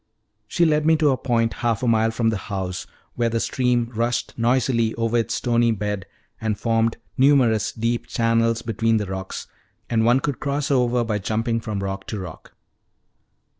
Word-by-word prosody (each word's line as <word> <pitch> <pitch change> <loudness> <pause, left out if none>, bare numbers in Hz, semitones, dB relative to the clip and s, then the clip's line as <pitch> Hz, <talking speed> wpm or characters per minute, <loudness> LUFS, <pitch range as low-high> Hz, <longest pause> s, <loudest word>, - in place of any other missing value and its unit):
She 170 +9 +2
led 155 -1 +2
me 160 +1 +4
to 150 -2 +3
a - - +2
point, 115 -3 0
half 120 -1 0
a - - +1
mile 115 -1 +3
from 115 0 0
the 110 - -1
house, 95 -2 -4 0.3
where 120 -1 0
the 115 0 -1
stream 120 -1 0
rushed 115 +2 -1
noisily 120 -1 +1
over 115 0 -1
its 115 - 0
stony 120 -1 +2
bed 105 -2 -3 0.3
and 110 -2 -1
formed 115 +1 +1 0.2
numerous 125 -6 +4
deep 115 +1 -2
channels 115 0 +1
between 115 0 +1
the 105 - -1
rocks, 95 0 -5 0.5
and 110 -1 +2
one 120 +3 +4
could 140 -1 -3
cross 145 +1 -1
over 125 -2 +2
by 110 -2 -1
jumping 115 +3 -1
from 105 -3 -4
rock 95 0 -4
to 105 - -4
rock. 90 -4 -9
115 Hz, 175 wpm, -23 LUFS, 110-120 Hz, 0.5 s, me